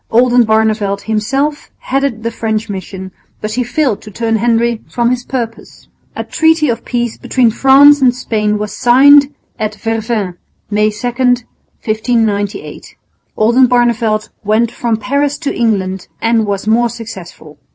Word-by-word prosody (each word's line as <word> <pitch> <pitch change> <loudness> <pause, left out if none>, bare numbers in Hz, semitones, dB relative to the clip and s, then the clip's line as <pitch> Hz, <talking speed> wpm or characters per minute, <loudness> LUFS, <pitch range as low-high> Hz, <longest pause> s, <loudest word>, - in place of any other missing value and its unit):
Oldenbarneveldt 220 -4 +2
himself 270 +8 -2
headed 270 -4 -2
the 230 - -2
French 220 -2 -3
mission, 190 0 -7 0.3
but 215 - -4
he 250 +3 -1
failed 250 -2 -1
to 215 - -11
turn 225 +2 -1
Henry 235 0 +1
from 240 0 0
his 250 -1 -2
purpose. 235 -3 -6 0.3
A - - -3
treaty 320 -2 +2
of 235 0 -2
peace 240 -2 -3
between 245 -3 +1
France 275 +4 +6
and 250 -2 +3
Spain 210 -4 -1
was 210 0 -5
signed 280 +3 +5 0.3
at 215 -1 -2
Vervins, 220 -3 -3 0.3
May 210 +1 +2
2, 210 +3 -5
1598. 225 -3 -2 0.4
Oldenbarneveldt 235 -2 +2
went 220 +3 +1
from 230 -2 -2
Paris 280 +5 -1
to 290 -1 -4
England 190 -5 -1
and 225 -1 +1
was 200 -1 -3
more 235 +2 +2
successful. 190 -9 -10
230 Hz, 135 wpm, -14 LUFS, 215-250 Hz, 0.4 s, France